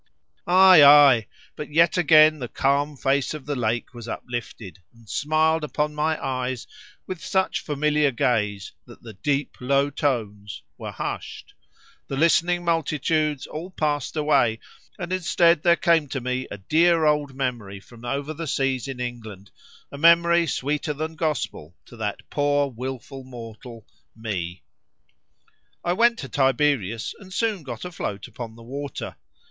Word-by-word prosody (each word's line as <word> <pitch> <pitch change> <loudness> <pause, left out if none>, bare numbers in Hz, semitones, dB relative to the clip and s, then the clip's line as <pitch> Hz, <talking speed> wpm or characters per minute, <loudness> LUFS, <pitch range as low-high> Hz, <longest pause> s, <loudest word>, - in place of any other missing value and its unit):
—Ay, 185 -2 +8
ay, 140 -5 +7 0.3
but 150 - -7
yet 165 +2 +3
again 155 -2 +6
the 125 - -4
calm 140 +3 0
face 135 +3 0
of 145 -4 -9
the 145 0 -3
lake 115 0 -2
was 120 -1 -9
uplifted, 115 -5 -6 0.2
and 115 -1 -20
smiled 155 +5 +1
upon 150 0 -2
my 155 +1 -1
eyes 130 -2 -3 0.4
with 185 -3 -7
such 190 0 0
familiar 150 0 +1
gaze, 105 -5 -1 0.2
that - - -15
the 115 -2 -10
"deep 140 +7 -2
low 140 +2 +1
tones" 105 -8 -3
were - - -7
hushed, - - -6 0.5
the 135 - -4
listening 175 +3 +2
multitudes 155 -2 0
all 165 +4 -7
passed 150 -4 -2
away, 140 -7 +2 0.4
and 180 0 -4
instead 170 -2 +3
there 170 0 +4
came 165 -3 +2
to 135 - -3
me 125 +1 -3
a - - -7
dear 160 - +3
old 150 -3 +1
memory 120 -7 -4
from 115 +3 -17
over 140 +5 -3
the 160 +1 -6
seas 135 -3 -1
in 135 -2 -6
England, 110 -5 -7 0.4
a 140 - -8
memory 170 +1 +5
sweeter 150 +2 -2
than 160 +2 -4
Gospel 150 - -3
to - - -14
that 105 -2 -4
poor 145 -1 +1
wilful 130 +2 -7
mortal, 115 -2 -11 0.3
me. 90 -7 -5 1.2
I 175 - +1
went 235 +4 +3
to 135 - -6
Tiberias, 130 -4 0
and 190 -2 -14
soon 215 -1 -1
got 125 -3 -7
afloat 135 - -5
upon 115 -2 -8
the 115 - -14
water. 140 +4 -6
140 Hz, 150 wpm, -24 LUFS, 120-155 Hz, 1.2 s, Ay